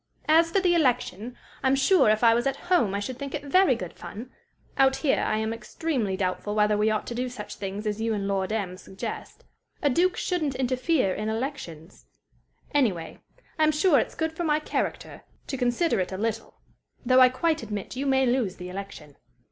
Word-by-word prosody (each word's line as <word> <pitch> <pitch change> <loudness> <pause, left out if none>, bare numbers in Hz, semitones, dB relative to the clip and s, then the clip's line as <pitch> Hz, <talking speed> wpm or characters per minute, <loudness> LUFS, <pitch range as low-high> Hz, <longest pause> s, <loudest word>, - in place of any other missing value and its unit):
"As 325 +2 +5
for 390 - +2
the 360 -2 +3
election, 245 - 0 0.2
I'm 265 0 +3
sure 275 - +4
if 215 +2 +2
I 230 -1 +7
was 240 +3 +1
at 275 - 0 0.2
home 225 - +3
I - - -1
should 245 +5 -5
think 280 0 -5
it 295 - -5
very 325 -1 +4
good 180 -7 -7
fun. 235 +5 -9 0.4
Out 265 0 +4
here 290 - +1
I 215 - 0
am 220 +1 -1
extremely 230 -2 -2
doubtful 190 +2 -2
whether 210 0 +3
we 210 +1 +2
ought 215 -1 -1
to - - -5
do 250 +1 -2
such 245 -4 -8
things 200 +2 -5
as 210 0 -2
you 225 0 0
and 200 -1 -3
Lord 195 0 -1
M 195 -4 -2
suggest. 190 +1 -7 0.4
A 290 - +2
duke 360 +7 +2
shouldn't 310 -7 -1
interfere 255 - +1
in 215 +2 -3
elections. 220 - -6 0.7
Anyway, 200 - 0 0.4
I'm 310 0 +4
sure 305 -1 +4
it's - - -3
good 320 0 -2
for 345 - -4
my 305 -2 +2
character 305 - -3 0.2
to 275 - -4
consider 250 - +1
it 185 - -2
a 190 - -4
little 225 +1 -3 0.5
though 255 +1 +5
I 255 - +8
quite 315 +5 0
admit 210 -1 -6
you 275 +2 -2
may 265 -1 +3
lose 240 -6 0
the 180 -1 -8
election. 180 -6 -9
245 Hz, 200 wpm, -26 LUFS, 205-285 Hz, 0.7 s, I